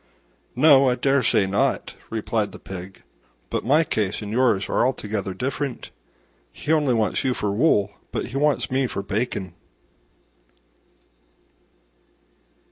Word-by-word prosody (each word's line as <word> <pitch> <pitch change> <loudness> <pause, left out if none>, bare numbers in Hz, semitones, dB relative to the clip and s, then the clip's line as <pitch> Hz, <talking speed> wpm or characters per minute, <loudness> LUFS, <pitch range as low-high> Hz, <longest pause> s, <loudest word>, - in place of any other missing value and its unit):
"No, 135 -1 +6
I 125 - +1
dare 135 +2 +2
say 105 -4 +3
not," 100 +1 0 0.2
replied 110 -1 -2
the - - -8
Pig, 95 0 -9 0.5
"but - - -1
my 150 +6 +4
case 105 -7 -2
and 105 - -6
yours 115 -4 +2
are - - +1
altogether 105 -6 -2
different: 135 0 -4 0.6
he 150 - -4
only 150 -6 +3
wants 110 -2 0
you 130 -2 0
for 105 - -1
wool, 105 -4 +2 0.2
but - - -3
he 130 - -4
wants 145 -2 +1
me 130 0 +1
for 100 -4 -4
bacon." 100 -3 -3
120 Hz, 130 wpm, -23 LUFS, 100-135 Hz, 0.6 s, No